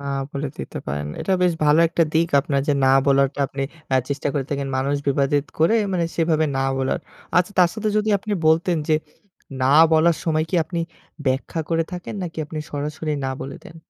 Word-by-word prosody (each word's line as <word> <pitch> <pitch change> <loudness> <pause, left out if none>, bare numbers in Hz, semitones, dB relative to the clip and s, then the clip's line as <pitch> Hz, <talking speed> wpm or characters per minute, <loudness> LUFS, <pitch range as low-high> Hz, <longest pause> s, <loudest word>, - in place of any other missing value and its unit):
না 140 - -9 0.3
বলে 140 0 -3
দিতে - - -6
পারেন। 75 +1 -3
এটা 190 - -1
বেশ 180 -1 +4
ভালো 150 +2 +5
একটা 165 0 +1
দিক 165 +1 +3
আপনার 140 0 0
যে 145 - +4
না - - +5 0.2
বলাটা 140 0 +3
আপনি 135 0 -5 0.3
এ - - +4
চেষ্টা 140 0 -2
করে 135 -2 -1
থাকেন। 140 -1 -2
মানুষ 140 +2 0
বিবাদিত 140 +1 +1
করে, 165 +8 +4 0.2
মানে 170 -2 +1
সেভাবে 160 -2 +2
না 135 - 0
বলার। 135 +5 0 0.4
আচ্ছা, 180 +3 +2
তার 180 - +6
সাথে 215 -1 -2
যদি 215 +1 +1
আপনি 210 +2 -5
বলতেন 165 +2 +3
যে, 155 - +4 0.7
না - - +3 0.3
বলার 160 +1 +4
সময় 155 -1 +1
কি - - -3
আপনি 170 +1 -3 0.5
ব্যাখ্যা 135 +5 -1
করে 165 -1 +1
থাকেন 180 +3 -6
নাকি 165 -2 -6
আপনি 155 +1 -7
সরাসরি 150 +2 -3
না 130 - -1
বলে 135 +1 -6
দেন? 165 - -12
155 Hz, 200 wpm, -22 LUFS, 140-170 Hz, 0.7 s, তার